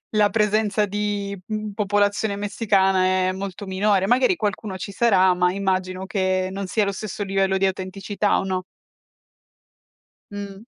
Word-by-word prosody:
la 210 -1 +4
presenza 210 -1 +1
di 205 -1 -3
m 215 0 -3
popolazione 205 0 +1
messicana 200 -2 +2 0.2
è 185 - +1
molto 195 +1 -6
minore. 190 0 +1
Magari 255 - +3
qualcuno 210 - -3
ci 200 - -5
sarà, 190 -4 +4
ma 180 0 +2
immagino 190 -1 -2
che 185 -2 0
non 195 0 -4
sia 210 +3 +1
lo 200 - 0
stesso 205 +1 -6
livello 195 -1 +1
di 195 - +3
autenticità, 195 +2 -1
o - - -2
no? 185 -1 -2 1.7
Mh. 200 +1 -8
200 Hz, 145 wpm, -23 LUFS, 190-210 Hz, 1.7 s, la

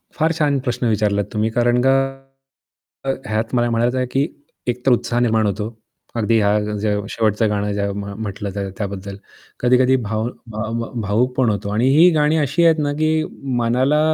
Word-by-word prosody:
फार 160 +1 +2
छान 145 -3 +1
प्रश्न 125 0 0
विचारलात 105 -1 +1
तुम्ही 110 0 +1
कारण 120 +1 +2
का 135 - +5 1.1
अ, - - -1 0.2
ह्यात 110 +2 -2
मला 120 0 +2
म्हणायचं 120 +2 +1
आहे 130 - +1
की 140 +2 +1 0.4
एक 125 +1 -2
तर 135 - +5
उत्साह 120 0 +1
निर्माण 110 -2 +2
होतो. 105 +1 -1 0.5
अगदी 115 0 +2
हा 105 +1 +3 0.2
जो 105 -1 0
शेवटचं 110 0 +1
गाणं 105 0 -1
ज्या 100 0 -1
म्ह 100 0 -5
म्हटलं 100 0 -4
त्यात 100 -1 -3
तर 95 - -6
त्याबद्दल 100 -1 -5 0.4
कधी-कधी 125 +1 +4
भाव 110 +2 -2 0.2
भाव 110 +2 -3 0.2
भावुक 110 +5 +1
पण 130 -3 +3
होतो 100 -1 -2
आणि 115 +4 +2
ही 175 +3 +8
गाणी 150 0 +2
अशी 150 +3 +1
आहेत 165 -1 +5
ना 145 0 0
की 155 0 +2 0.5
मनाला 130 +5 +2
115 Hz, 180 wpm, -20 LUFS, 105-130 Hz, 1.1 s, ही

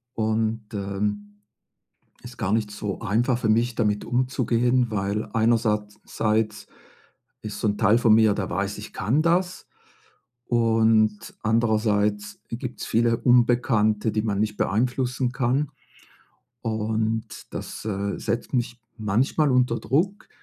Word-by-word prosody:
und, 110 0 -1
ähm, 105 +1 -4 0.8
ist 120 0 -11
gar 100 -4 -1
nicht 110 -1 0
so 105 -1 -5
einfach 115 +3 +1
für 115 -3 -1
mich, 115 +2 +2
damit 105 -2 0
umzugehen, 125 0 +1
weil 105 0 -2
einersatz 110 -2 +1
seits 110 -1 -1 0.8
ist 105 -1 -6
so - - 0
'n 105 0 0
Teil 110 +3 +4
von 115 -3 +5
mir, 110 -2 +5
der 95 -3 -3
weiß, 100 +3 -2
ich 105 - -9
kann 110 +10 +1
das. 180 +3 0 0.8
Und 110 -2 +2
andererseits 105 -2 +1
gibt's 120 +1 -5
viele 115 0 +2
Unbekannte, 115 -3 +3
die 110 0 -1
man 105 -3 -1
nicht 105 0 -1
beeinflussen 125 +3 0
kann. 135 +2 0 0.9
Und 110 0 -1 0.3
das, - - -7
äh, 100 -1 -2
setzt 120 +3 -3
mich 120 -1 -1 0.2
manchmal 120 +8 +1
unter 125 -2 +2
Druck. 190 +9 -1
110 Hz, 125 wpm, -24 LUFS, 105-120 Hz, 0.9 s, von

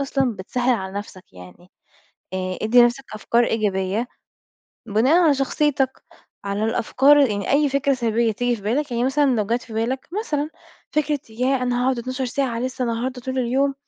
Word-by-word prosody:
أصلًا 270 -4 0
بتسهِّل 245 +6 0
على 190 -3 -5
نفسك 185 - -11
يعني، 90 - -14 0.6
آآ 185 0 -3
ادّي 240 +3 +6
نفسك 240 +3 +1
أفكار 235 +3 +1
إيجابية، 210 0 -1 0.8
بناءً 250 - +3
على 310 -4 +5
شخصيتك، 270 -1 0 0.4
على 200 +2 -2
الأفكار، 265 +6 +3
يعني 210 -8 +1
أي 290 +1 +3
فكرة 275 0 +1
سلبية 230 -2 +1
تيجي 245 +2 -1
في 205 - -14
بالك، 260 +8 -1
يعني 235 +1 0
مثلًا 285 +3 +2
لو 210 -2 0
جات 235 +3 -1
في 230 - -12
بالك 235 +4 -2
مثلًا 300 -8 -2 0.4
فكرة 300 -2 0
ياه 255 +3 0
أنا 245 0 0
هاقعد 260 -1 +1
12 255 +2 -3
ساعة 245 -2 -2
لسّه 255 0 -3
النهارده 245 +2 -3
طول 260 +1 -4
اليوم، 270 +3 +1
245 Hz, 170 wpm, -22 LUFS, 220-270 Hz, 0.8 s, ادّي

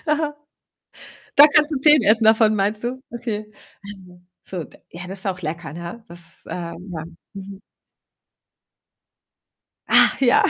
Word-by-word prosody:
Aha. 300 -1 -1 1.0
Da 290 - +10
kannst 300 +1 +3
du 295 - -2
10 300 0 +4
essen 220 +2 +3
davon, 220 0 +4
meinst 210 +2 -1
du? 255 +2 -4
Okay. 215 -3 -6 0.3
Also, 185 -3 -13 0.2
so 180 -4 -6
d - - -18
ja, 175 +2 -9
das 190 +1 -8
ist - - -4
auch 185 -1 -3
lecker, 160 -1 -6
ne? 170 +7 -9
Dass, 170 -1 -14
ähm 175 +2 -7
ja, 160 -1 -6 0.3
mhm. 195 0 -10 2.3
Ach - - +4
ja. 250 -2 +4
205 Hz, 145 wpm, -21 LUFS, 180-240 Hz, 2.3 s, Da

